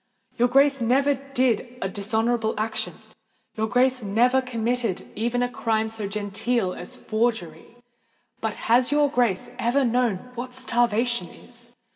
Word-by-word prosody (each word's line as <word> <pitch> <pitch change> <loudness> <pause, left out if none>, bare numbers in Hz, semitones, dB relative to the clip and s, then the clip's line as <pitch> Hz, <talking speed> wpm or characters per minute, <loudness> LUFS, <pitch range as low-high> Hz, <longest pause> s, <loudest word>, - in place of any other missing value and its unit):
Your 245 - +3
Grace 275 +1 +4
never 270 +5 +3
did 255 -3 -1
a 195 - -1
dishonourable 220 +3 0
action—your 220 0 -5
Grace 255 +2 +2
has 215 - -7
never 245 +6 +3
committed 235 -4 -2
even 240 +3 0
a - - +1
crime 220 -2 -1
so 220 -2 -4
genteel 205 0 -1
as 175 - -7
forgery! 215 -6 -2 0.6
But 220 -2 -2
has 245 +3 +2
your 290 -1 +3
Grace 245 -2 0
ever 255 +3 +2
known 240 -2 0
what 250 +1 -6
starvation 240 -4 +1
is? 240 0 -11
240 Hz, 135 wpm, -24 LUFS, 220-250 Hz, 0.6 s, Grace